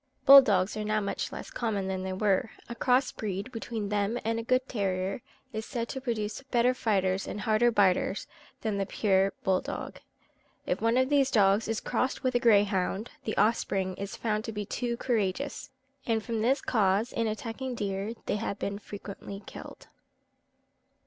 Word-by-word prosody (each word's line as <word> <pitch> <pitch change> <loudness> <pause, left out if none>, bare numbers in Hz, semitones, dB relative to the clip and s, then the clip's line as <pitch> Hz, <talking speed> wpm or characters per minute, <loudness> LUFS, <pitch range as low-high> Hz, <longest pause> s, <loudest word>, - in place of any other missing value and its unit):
Bull 275 0 +12
dogs 200 -6 +1
are 215 - -3
now 215 0 +1
much 200 -1 -3
less - - -7
common 210 -5 -2
than 190 -1 -2
they 190 0 -3
were. 200 +2 +1 0.2
A 235 - -5
cross 250 +2 +2
breed 205 +3 -4
between 225 -3 -4
them 205 +2 0
and 225 0 0
a - - -4
good 255 +2 +1
terrier 195 -1 -2 0.3
is 220 0 -3
said 235 -1 -4
to 265 - -4
produce 225 -3 -3
better 245 0 +3
fighters 195 -5 0
and 205 - -5
harder 220 +2 +3
biters 200 -2 +2 0.4
than 210 -3 -1
the 195 - -1
pure 195 -2 +2
bull 190 -1 +2
dog. - - -6 0.7
If - - -1
one 230 +2 +2
of 260 0 +3
these 280 -2 +3
dogs 205 -1 +3
is 225 -1 -1
crossed 260 +1 -1
with 255 -1 +1
a 245 - +3
greyhound, 205 -2 +2
the 215 - -3
offspring 195 -4 +1
is 200 0 -5
found 215 -2 -1
to 225 - -4
be 210 -1 -4
too 235 +3 -2
courageous, 235 +3 -1 0.4
and 225 -2 +1
from 230 -2 -2
this 260 +4 +2
cause 210 +1 +1
in 230 -1 0
attacking 235 +4 -4
deer 200 0 -3
they - - 0
have 205 -2 -3
been 200 0 -3
frequently 200 -1 -8
killed. - - -10
215 Hz, 180 wpm, -29 LUFS, 200-235 Hz, 0.7 s, Bull